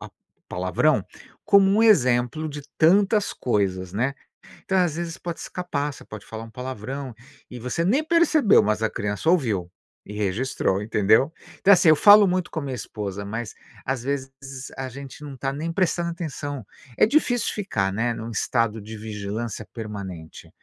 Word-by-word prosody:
a - - -10 0.4
palavrão - - +1 0.4
como 200 -2 +5
um 210 +3 +3
exemplo 135 - +3
de 145 0 -6 0.2
tantas 200 +5 +4
coisas, 95 -6 -1
né. 130 +7 0 0.5
Então, 190 - +1
às 170 -4 +1
vezes, 170 -1 -4
pode 170 -1 -6
escapar, 150 -5 -3
você - - -14
pode 105 -3 -10
falar 110 +2 -7
um - - -12
palavrão 130 +2 -6 0.4
e 125 - -8
você 125 +8 -2
nem 265 +11 +2
percebeu, 320 - +4
mas 105 +1 0
a 110 - +2
criança 105 +10 -2
ouviu 110 - +1 0.4
e 105 - -9
registrou, 105 -1 -1
entendeu? 110 +6 +3 0.3
Então, 200 - +7
assim, 170 -3 +5
eu 155 - +7
falo 205 +3 +8
muito 180 0 0
com 160 - -3
a - - -5
minha 135 -2 -4
esposa, 100 -2 -5
mas, 110 +2 -5 0.3
às 130 -2 -1
vezes, 135 0 -3 0.5
a 130 0 -3
gente 140 +2 -10
não 140 -2 -8
tá 135 +2 -2
nem 160 +4 -3
prestando 175 -1 0
atenção. 145 - -5 0.3
É - - +6
difícil 245 -3 +1
ficar, 100 - -1
né, 120 +3 0
num 115 +1 -6
estado 115 0 0
de 110 +2 -9
vigilância 105 +1 -5
permanente 100 - -8
130 Hz, 170 wpm, -24 LUFS, 110-170 Hz, 0.5 s, falo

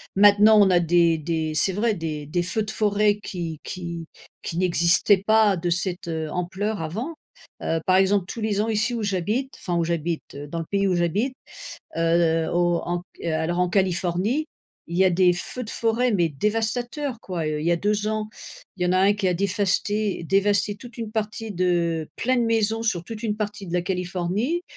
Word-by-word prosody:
maintenant 205 +2 +7
on 200 - +6
a 175 - +5
des 170 -1 +3
des 160 0 -2
c'est 190 +4 +3
vrai 220 +2 +1
des 155 -3 -4
des 175 +4 0
feux 215 +5 -1
de 215 - -5
forêt 210 -1 +2
qui 165 -4 -5
qui 170 -3 -6 0.4
qui 165 - -4
n'existaient 180 +2 +3
pas 215 -3 +4
de 175 +1 -2
cette, 180 0 -1
heu, 160 -2 -3
ampleur 190 +3 -2
avant. 220 - -4 0.5
Heu, 165 - 0
par 185 - +5
exemple 195 0 +3
tous 230 - -6
les 210 -2 0
ans 220 - -1
ici 225 +3 +1
où 225 - -3
j'habite, 210 +7 -1
enfin 175 - -3
où 170 - +2
j'habite, 170 -2 -3
dans 165 +2 -4
le 165 - -4
pays 200 -1 +2
où 180 - +1
j'habite, 200 - 0 0.6
heu, 165 -1 +2
au 175 0 +2
en 175 0 -2
q - - -8
heu, 160 - 0
alors 165 +3 -1
en 180 - +2
Californie, 190 - 0 0.4
il 170 +2 -3
y 190 - +5
a 185 - +4
des 180 0 +4
feux 175 +8 -4
de 220 - -7
forêt, 230 +2 +1
mais 175 -4 +2
dévastateurs 225 - -1
quoi, 175 -4 -4
heu. 155 0 -2
Il 155 - -3
y 170 - +3
a 170 - +2
2 210 +3 0
ans, 215 0 -2 0.5
il 180 - -4
y - - +2
en 180 - +1
a 185 - +3
1 195 +2 +5
qui 200 -2 0
a - - +2
défasté 200 +1 0
dévasté 200 +3 +2
toute 240 +2 -12
une 220 -2 -5
partie 220 0 -3
de 170 -3 0
plein 255 +1 +1
de 240 - +2
maisons, 225 0 +1
sur 185 -7 -1
toute 220 +1 -8
une 210 -2 -1
partie 210 -1 -4
de - - -7
la 180 - +2
Californie. 185 - -2
190 Hz, 210 wpm, -24 LUFS, 170-215 Hz, 0.6 s, maintenant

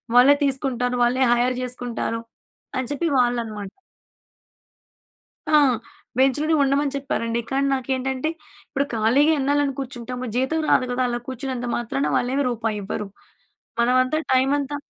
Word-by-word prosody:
వాళ్ళే 260 +4 +8
తీసుకుంటారు. 250 -2 -1
వాళ్ళే 250 +2 +2
హైర్ 245 +1 +1
చేసుకుంటారు 245 -2 -3 0.6
అని 255 -2 -2
చెప్పి 335 +4 -1
వాళ్ళనమాట. 230 -5 -1 1.8
ఆ! - - 0 0.7
బెంచ్‌లోనే 290 +4 +3
ఉండమని 280 +1 +1
చెప్పారండి. 235 -4 -2
కానీ 275 +1 +1
నాకేంటంటే 265 +2 -1 0.4
ఇప్పుడు 280 -1 0
ఖాళీగా 245 +8 +4
ఎన్నాళ్ళని 285 0 +1
కూర్చుంటాము. 250 -1 -5
జీతం 265 +6 +1
రాదు 255 - +4
కదా! 245 +1 -1
అలా 240 0 -2
కూర్చున్నంత 260 -1 -4
మాత్రాన, 240 +4 -1
వాళ్ళేమి 265 +3 0
రూపాయి 225 -3 -2
ఇవ్వరు. 205 +1 -4 0.7
మనమంతా 255 +4 +3 0.2
టైమంతా 280 +2 +1
255 Hz, 115 wpm, -23 LUFS, 240-275 Hz, 1.8 s, వాళ్ళే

